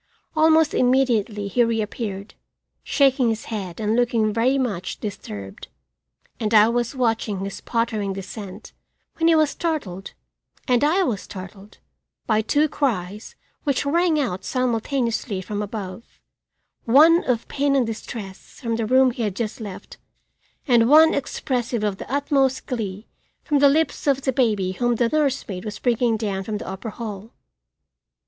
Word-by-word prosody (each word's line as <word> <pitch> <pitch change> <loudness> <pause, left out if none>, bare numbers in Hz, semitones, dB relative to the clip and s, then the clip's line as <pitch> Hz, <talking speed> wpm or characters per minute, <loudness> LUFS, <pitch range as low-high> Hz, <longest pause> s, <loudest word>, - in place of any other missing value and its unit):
Almost 315 0 +4
immediately 240 -5 +1
he 240 +5 +2
reappeared, 215 -3 -3 0.5
shaking 265 -3 +3
his 225 0 -3
head 185 -5 -5
and 215 0 0
looking 230 -3 +1
very 245 +5 +2
much 210 -9 -3
disturbed, 105 - -7 0.7
and 220 0 0
I 215 +1 +7
was 240 +2 -1
watching 225 -5 0
his 195 0 -5
pottering 220 -4 -1
descent 195 +1 -8 0.4
when 330 - +2
he 335 - +5
was 310 -2 +3
startled, 250 - -4 0.5
and 250 -1 +3
I 345 +6 +3
was 230 - -1
startled, 195 +2 -11 0.5
by 215 -1 +2
two 290 +8 +2
cries 210 - -3 0.3
which 280 -1 0
rang 330 +1 +2
out 190 -9 -2
simultaneously 240 -3 -1
from 205 +2 -4
above, 205 0 -7 0.7
one 315 +8 +6
of 235 -3 -1
pain 280 0 0
and 260 -3 +3
distress 215 -3 -8
from 230 -2 -2
the 225 -2 -1
room 260 +1 +5
he 240 - -6
had 205 -4 -1
just 225 +2 -4
left, 200 -4 -9 0.7
and 240 -2 +4
one 315 +2 +7
expressive 245 -4 -2
of 205 -2 -1
the - - -9
utmost 275 -2 +1
glee 210 -4 -4 0.4
from 295 -3 +1
the 280 0 +6
lips 315 +1 0
of 275 -1 +2
the 265 - 0
baby 210 -7 +1
whom 240 +5 0
the 230 0 +1
nursemaid 270 -11 -1
was 210 -1 -6
bringing 235 -2 +1
down 200 -3 -2
from 210 +1 -3
the - - -8
upper 190 +4 -5
hall. 215 -1 -7
230 Hz, 150 wpm, -23 LUFS, 205-265 Hz, 0.7 s, I